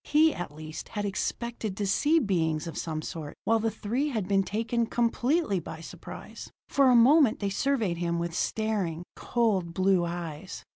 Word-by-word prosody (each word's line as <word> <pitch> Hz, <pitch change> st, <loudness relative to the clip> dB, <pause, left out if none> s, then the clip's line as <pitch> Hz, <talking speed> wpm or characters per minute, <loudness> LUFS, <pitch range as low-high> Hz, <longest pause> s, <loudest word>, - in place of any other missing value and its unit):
He, 310 Hz, +1 st, +4 dB
at 175 Hz, -4 st, -5 dB
least, 155 Hz, +1 st, -8 dB
had 205 Hz, -2 st, -3 dB
expected 215 Hz, +1 st, -3 dB
to 205 Hz, -, -1 dB
see 295 Hz, +11 st, +3 dB
beings 170 Hz, -, +1 dB
of 165 Hz, -, -6 dB
some 155 Hz, -1 st, -3 dB
sort, 155 Hz, -4 st, -6 dB
while 225 Hz, 0 st, +3 dB
the 225 Hz, +1 st, +1 dB
three 230 Hz, +7 st, -2 dB
had 220 Hz, -9 st, -2 dB
been 195 Hz, 0 st, +3 dB
taken 225 Hz, +4 st, -1 dB
completely 240 Hz, -, +1 dB
by 160 Hz, -, -8 dB
surprise. -, -, -9 dB, 0.2 s
For 275 Hz, -2 st, +4 dB
a 250 Hz, -, +6 dB
moment 260 Hz, +1 st, +6 dB
they 200 Hz, -1 st, -1 dB
surveyed 220 Hz, -6 st, 0 dB
him 170 Hz, 0 st, -1 dB
with 170 Hz, 0 st, -2 dB
staring, 195 Hz, -5 st, -1 dB
cold 195 Hz, -8 st, 0 dB
blue 185 Hz, -1 st, +3 dB
eyes. 170 Hz, 0 st, -5 dB
200 Hz, 175 wpm, -28 LUFS, 170-235 Hz, 0.2 s, a